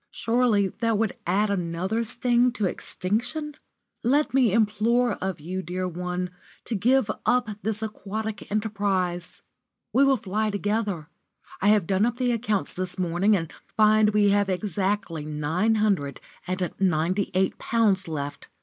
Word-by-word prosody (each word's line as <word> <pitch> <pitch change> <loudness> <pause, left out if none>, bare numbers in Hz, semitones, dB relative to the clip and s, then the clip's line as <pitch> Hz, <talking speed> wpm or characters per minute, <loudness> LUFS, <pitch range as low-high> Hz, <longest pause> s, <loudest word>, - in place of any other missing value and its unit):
Surely 230 -4 +2
that 230 -2 +1
would 220 -2 0
add 200 +4 +2
another 185 +4 -1
sting 240 +2 +2
to 215 -5 -1
extinction? 235 - -2 0.5
Let 285 +5 +2
me 255 -5 +4
implore 230 +3 +2
of 190 -3 -2
you, 180 +5 -4
dear 185 +2 -3
one, 180 +1 -3 0.3
to - - -3
give 235 +2 +2
up 245 -3 +2
this 220 0 -2
aquatic 215 0 -5
enterprise. 200 -4 -1 0.5
We 270 - +5
will 275 -1 +4
fly 215 +1 -1
together. 205 -5 -1 0.5
I 200 - +2
have 210 -4 +4
done 195 +5 +2
up 240 0 -3
the 250 -1 +1
accounts 215 -4 -1
this 185 0 -4
morning, 185 +4 +2
and 165 -3 -5 0.2
find 215 0 +5
we 210 -1 +3
have 200 0 +2
exactly 190 -3 -1
nine 155 +9 0
hundred 195 -10 0 0.3
and 185 -1 -2
ninety 185 +1 +1
eight 190 0 +1
pounds 205 -5 +1
left. 145 -3 -5
205 Hz, 145 wpm, -25 LUFS, 185-225 Hz, 0.5 s, We